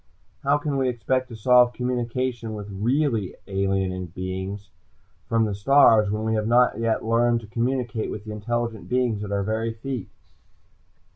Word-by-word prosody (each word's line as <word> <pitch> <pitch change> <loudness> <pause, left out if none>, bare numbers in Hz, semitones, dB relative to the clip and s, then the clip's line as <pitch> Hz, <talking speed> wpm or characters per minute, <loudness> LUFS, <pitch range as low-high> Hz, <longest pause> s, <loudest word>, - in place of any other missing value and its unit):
How 140 +1 +3
can 145 -1 -2
we 130 -1 +1
expect 130 +2 -1
to 115 - -8
solve 125 +2 +5
communication 125 -2 -2
with 105 -1 -7
really 115 +1 0
alien 95 -2 -1
beings 95 +3 -5 0.6
from 115 -1 +3
the 105 - -2
stars, 110 -1 +5
when 105 +1 -2
we 110 0 0
have 110 -1 0
not 120 0 +3 0.2
learned 115 +1 +2
to - - -11
communicate 120 0 -2
with 105 0 -6
the 110 - -6
intelligent 115 +1 -3
beings 125 -4 0
at 100 - -6
our 100 -1 0
very 110 +2 -1
feet?" 125 -2 -5
115 Hz, 155 wpm, -24 LUFS, 105-125 Hz, 0.6 s, solve